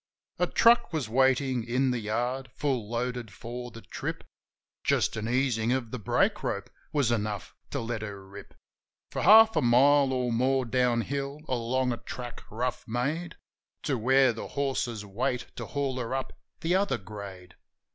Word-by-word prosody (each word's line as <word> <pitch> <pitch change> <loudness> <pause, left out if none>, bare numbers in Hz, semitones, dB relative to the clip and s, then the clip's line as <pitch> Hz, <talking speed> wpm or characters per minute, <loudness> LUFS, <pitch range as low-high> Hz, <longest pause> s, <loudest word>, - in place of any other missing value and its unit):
A - - +3
truck 235 -2 +5
was 155 -8 -2
waitin' 130 +1 +2
in 125 +3 +1
the 125 - -1
yard, 120 +5 -2
full 130 -7 -1
loaded 120 -1 -3
for 120 +3 -7
the 115 0 -11
trip. - - -5 0.6
Just - - +2
an 110 +1 -3
easin' 120 -3 +1
of 125 -3 0
the 125 - -4
brake 105 - +1
rope - - -3 0.2
was 140 -6 +2
enough 105 -4 -2 0.2
to - - -2
let 115 -1 -3
her 100 -2 -7
rip 100 +1 -12 0.6
For - - -2
half 220 +1 +8
a - - +3
mile 135 +3 +5
or 125 -2 0
more 130 +2 +2
down 120 0 +2
hill 140 +3 -4
along 125 +1 0
a 120 - -2
track, 120 +1 -7
rough 125 +3 -3
made. 150 +9 -2 0.5
To 140 - 0
where 130 +2 +4
the 115 - -6
horses 130 -6 -2
wait 120 +4 -2
to - - -6
haul 140 -3 -2
her 120 +1 -2
up 135 - -3 0.3
the 165 +2 +1
other 195 -5 +2
grade. 95 -4 -9
125 Hz, 165 wpm, -28 LUFS, 115-135 Hz, 0.6 s, half